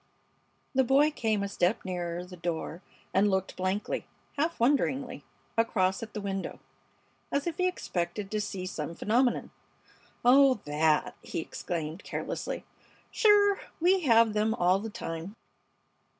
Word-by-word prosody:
The 265 0 +4
boy 275 +4 +4
came 220 -7 0
a - - -1
step 195 +1 0
nearer 175 -1 -3
the 180 0 -10
door 170 0 -4 0.3
and 200 +2 +4
looked 190 -1 -1
blankly, 185 +3 -2 0.3
half 320 +4 -1
wonderingly, 265 +1 +1 0.3
across 190 -5 +1
at 225 -1 -8
the 210 - -3
window, 195 -1 -4 0.7
as 280 - 0
if 340 -1 -3
he 365 -1 +2
expected 195 - -3
to 215 -1 0
see 195 -2 -4
some 165 -2 -4
phenomenon. 240 +6 +1 0.7
"Oh! 265 +1 +7
That!" 150 +1 +2
he - - -6
exclaimed, 165 +1 -4
carelessly. - - -4 0.5
"Sure! 410 -2 +5 0.2
We 365 +3 +4
have 230 -8 +4
them 215 +1 +1
all 180 0 +3
the 225 +2 -5
time." 165 0 -6
210 Hz, 135 wpm, -29 LUFS, 180-265 Hz, 0.7 s, Oh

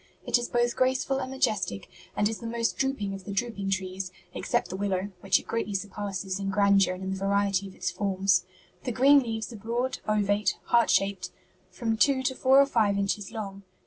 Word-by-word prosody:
It - - +3
is 240 - -4
both 240 0 +1
graceful 260 +1 +1
and 260 - -4
majestic, 210 - -1 0.3
and 205 - +3
is 220 0 -4
the 230 - -6
most 230 0 -1
drooping 270 -8 -1
of 195 -1 -7
the 205 - -5
drooping 200 -1 -2
trees, 190 0 -3 0.2
except - - -1
the - - -4
willow, 195 0 -1
which 190 0 +3
it - - -8
greatly 220 -3 -2
surpasses 195 -1 -4
in 195 0 -2
grandeur 195 -2 +3
and 185 - -8
in 190 - -3
the - - -1
variety 200 0 +1
of 190 - -13
its 185 - -2
forms. 195 -2 +1 0.4
The 250 - -2
green 275 +4 +6
leaves 225 -2 -4
are - - -8
broad, 235 +5 -2
ovate, 205 0 +1
heart 235 -1 +3
shaped, 195 -2 +1 0.4
from 225 -2 -2
two 265 +2 +3
to 260 - +1
four 260 +1 +5
or 280 - +7
five 215 -7 +2
inches 200 +1 -1
long. 200 -3 -6
205 Hz, 205 wpm, -27 LUFS, 195-235 Hz, 0.4 s, or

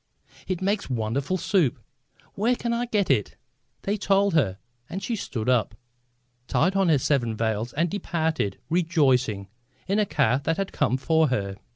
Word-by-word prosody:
"It 185 -1 -2
makes 200 -2 0
wonderful 130 +8 -1
soup! 180 - +1 0.6
Where 230 +5 +1
can 235 -1 -2
I 240 +1 -1
get 205 -8 +1
it?" 110 -7 0 0.5
They 205 +2 0
told 200 -1 +2
her, 110 - +2 0.3
and 190 +2 -5
she 235 - -1
stood 120 - -4
up, 115 -5 +2 0.7
tied 185 +5 +2
on 195 -3 +3
her 155 - +5
seven 125 -5 0
veils 110 +1 -1
and 165 +4 +1
departed, 160 - -1
rejoicing, 135 - +2 0.4
in 200 +2 +1
a 210 - +2
car 130 -6 +2
that 165 +3 -1
had 195 0 -2
come 130 - +1
for 160 +3 +2
her. 100 -7 -2
160 Hz, 165 wpm, -25 LUFS, 120-195 Hz, 0.7 s, her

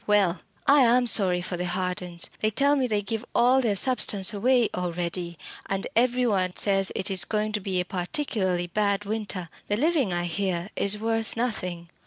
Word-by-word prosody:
"Well, 200 -4 +2 0.3
I 285 0 +6
am 245 0 +4
sorry 185 -6 +3
for 180 0 -4
the 180 +1 -3
Hardens. 180 -1 -3
They 215 - +1
tell 280 +6 +3
me 265 -3 +1
they 210 -3 0
give 220 +3 -3
all 255 +2 +4
their 220 -5 0
substance 205 -3 +3
away 240 +3 +2
already 175 -1 -3 0.3
and 195 0 -2
every 250 +1 +2
one 185 -5 0
says 195 -2 +2
it 195 +1 -2
is 190 -1 +4
going 215 0 -1
to 210 - -1
be 190 -2 -2
a 180 - -1
particularly 185 -1 -2
bad 200 +2 -1
winter. 205 -4 -4 0.2
The 205 - 0
living, 290 - +1
I 175 0 -1
hear, 180 +1 -2
is 200 +1 +2
worth 225 +1 -2
nothing. 185 -8 -3
200 Hz, 185 wpm, -25 LUFS, 180-230 Hz, 0.3 s, I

